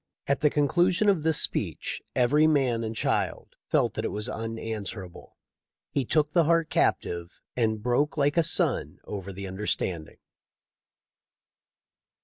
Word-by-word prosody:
At 140 - +1
the 150 - +5
conclusion 175 +8 +2
of 190 -6 +2
this 160 0 +2
speech - - -1
every 145 +5 +4
man 130 -7 +2
and 110 0 -4
child - - -1
felt - - +2
that - - -3
it - - 0
was 105 +2 -3
unanswerable. 110 -5 -6 0.5
He 140 -3 0
took 150 +3 +1
the 170 -3 +4
heart 165 0 +2
captive 85 +1 0 0.2
and 110 -3 0
broke 135 +6 +1
like 145 0 +2
a 170 - +5
sun 160 - 0
over 100 -1 -6
the 100 +1 -7
understand 95 -4 -2
ing." - - -22
125 Hz, 140 wpm, -27 LUFS, 105-150 Hz, 0.5 s, the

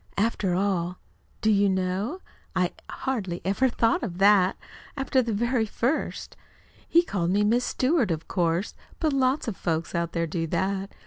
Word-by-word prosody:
"After 200 -4 +1
all, 180 -2 0 0.4
do 220 - +3
you 200 -1 +4
know? 190 - -1 0.3
I 180 -1 +2 0.2
hardly 205 -10 -3
ever 200 +8 +2
thought 230 -1 +1
of 180 -8 -4
that, 195 -1 +5 0.4
after 270 -1 +2
the 235 -2 -2
very 235 +1 +1
first. 245 +8 -2 0.5
He 340 +1 +5
called 175 - -1
me 200 +3 +2
Miss 235 +4 +2
Stewart, 260 - +1
of 165 -1 -3
course 175 +1 0 0.3
but 310 -3 +1
lots 265 +1 +1
of 220 - -2
folks 165 -2 -2
out 170 -1 -1
there 170 -1 0
do 165 0 -2
that. 190 +4 -1
200 Hz, 165 wpm, -26 LUFS, 180-240 Hz, 0.5 s, that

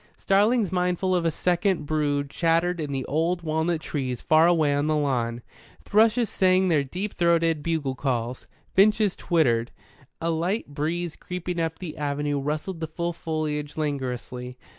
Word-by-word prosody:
Starlings 210 +1 +2
mindful 180 0 0
of 175 -2 +1
a - - +4
second 175 0 0
brood 145 -2 0
chattered 170 +1 +1
in 150 -3 -3
the 135 -2 -2
old 165 +4 0
walnut 160 +1 0
trees 130 -6 -3
far 160 +1 +4
away 160 -4 +3
on 145 +1 0
the 155 - +2
lawn; 120 -5 -1 0.4
thrushes 225 +2 +3
sang 185 -1 +3
their 155 -4 +3
deep 185 +10 -5
throated 165 -2 +2
bugle 155 -4 -1
calls; 125 -2 -3 0.3
finches 210 0 +4
twittered. 120 -9 +1 0.5
A 165 0 0
light 175 +7 -1
breeze 165 +3 -2
creeping 180 -1 -5
up 160 0 -2
the 170 -5 -7
avenue 145 -1 -1
rustled 155 +5 -3
the 160 - -3
full 170 +2 -3
foliage 155 -3 -3
languorously. 125 -4 -4
160 Hz, 155 wpm, -25 LUFS, 145-180 Hz, 0.5 s, a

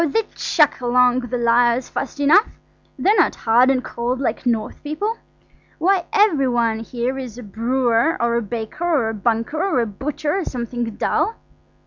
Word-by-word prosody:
they'd 450 -2 -1
chuck 300 -5 +1
along 250 0 +3
the 245 0 -4
lyres 240 +1 +2
fast 275 +1 -5
enough–they're 385 +5 +1
not 345 - +3
hard 240 +3 +3
and 260 -1 +1
cold 245 +2 -3
like 255 -1 -2
North 225 -3 -1
people. 355 +10 -3 0.6
Why, 365 +2 +2
every 405 -11 +3
one 235 -3 +1
here 245 +3 -3
is 245 -4 -7
a 245 - -8
brewer, 235 - 0
or 235 0 +1
a 235 - +1
baker, 225 - -5
or 305 -10 +1
a - - -3
banker, 230 +8 -1
or 385 -9 +1
a 235 - +1
butcher, 290 +8 -4
or 390 - -1
something 240 -3 -4
dull. 450 - 0
250 Hz, 165 wpm, -20 LUFS, 235-300 Hz, 0.6 s, along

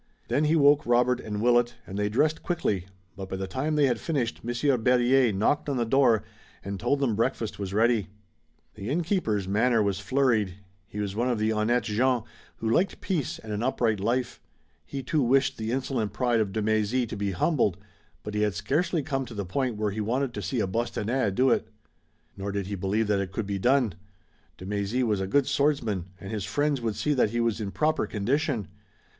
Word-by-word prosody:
Then 150 - +2
he 155 +2 +3
woke 145 -2 +5
Robert 120 +1 +3
and 105 0 -4
Willet, 120 0 +3
and 95 - -8
they 105 0 0
dressed 150 +8 +1
quickly, 105 - -1 0.3
but 95 0 -7
by 95 - -3
the 95 0 -3
time 130 +11 -2
they 150 -1 +4
had 120 -4 +1
finished 135 -8 -2
Monsieur 120 +4 +1
Berryer 125 +1 +3
knocked 110 +10 +1
on 140 - -1
the 120 - +1
door 120 -4 +3 0.4
and 100 0 -4
told 140 +9 +1
them 125 -6 +1
breakfast 115 -1 -1
was 100 -2 -4
ready. 110 0 +2 0.7
The 105 +1 -6
innkeeper's 155 - 0
manner 110 +3 +3
was 100 -1 0
flurried. 110 -4 +1 0.3
He 105 - -7
was 100 -1 -3
one 120 +3 0
of 120 - +1
the 110 +1 +1
honnêtes 115 +3 +1
gens 120 +2 +1 0.3
who 115 - -4
liked 175 +13 +1
peace 165 -8 -2
and 110 -1 -7
an 105 - -2
upright 115 -4 +1
life. 120 +4 -1 0.5
He 135 - -5
too 150 +4 +1
wished 135 +1 +2
the 110 +1 -2
insolent 125 -5 -1
pride 120 +1 +1
of 105 -3 0
de 110 +1 -2
Mézy 110 +3 +1
to 110 - -6
be 100 -1 -2
humbled, 100 - +1 0.5
but 105 - -6
he 105 - 0
had 105 -2 +1
scarcely 150 - 0
come 135 -3 -2
to 115 - -9
the 100 -1 -3
point 125 +5 -1
where 105 -1 0
he 110 +2 -3
wanted 125 +4 -1
to - - -4
see 125 -4 -1
a - - +1
Bostonnais 115 +3 -1
do 125 +7 +2
it. 110 - +1 0.7
Nor 100 +1 -4
did 100 -1 -2
he 100 - -5
believe 100 +3 0
that 105 -1 +1
it 95 -1 -4
could 105 +2 -3
be 100 -1 -3
done. 125 -2 +3 0.6
De 90 - -9
Mézy 105 +5 -1
was 105 -5 +1
a 95 - -2
good 140 +7 +3
swordsman, 140 - 0
and 95 - -8
his 105 -3 -3
friends 140 +7 0
would 110 -3 -2
see 150 - 0
that 125 -6 +2
he 120 +2 -2
was 115 -1 0
in 100 - -3
proper 155 +9 0
condition. 120 - -1
115 Hz, 210 wpm, -27 LUFS, 105-130 Hz, 0.7 s, woke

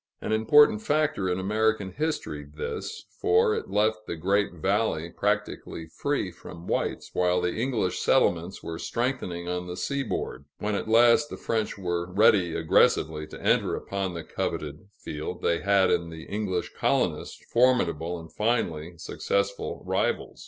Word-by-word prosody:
An - - -4
important 110 +1 +5
factor 145 -9 +1
in 90 +1 0
American 105 0 +1
history 95 - -3
this, 80 - -5
for 440 +2 +4
it 445 -1 -4
left 110 +1 +1
the - - -3
great 100 +5 +1
valley 90 -2 0
practically 80 - -2
free 100 - -2
from 85 0 -11
whites - - -2
while 90 0 +2
the 90 0 0
English 115 -5 -1
settlements 85 +2 +1
were 80 0 -5
strengthening 95 -9 -2
on 90 0 -3
the 90 0 -6
seaboard; 135 - -3
when 105 +1 -2
at 100 - -2
last 120 +6 +5
the - - -7
French 110 -2 -2
were 85 -2 -2
ready 95 -3 +4
aggressively 80 -1 +2
to - - -10
enter - - +2
upon 95 -2 -3
the 85 - -5
coveted 75 +4 -4
field, 75 0 -6
they 85 - +2
had 100 -1 +3
in 85 0 +1
the 80 -1 -9
English 100 -3 -3
colonists - - 0 0.2
formidable 90 -10 +2
and 80 0 -12
finally 90 -8 -1
successful 100 +4 -2
rivals. - - -1
95 Hz, 150 wpm, -27 LUFS, 85-110 Hz, 0.2 s, important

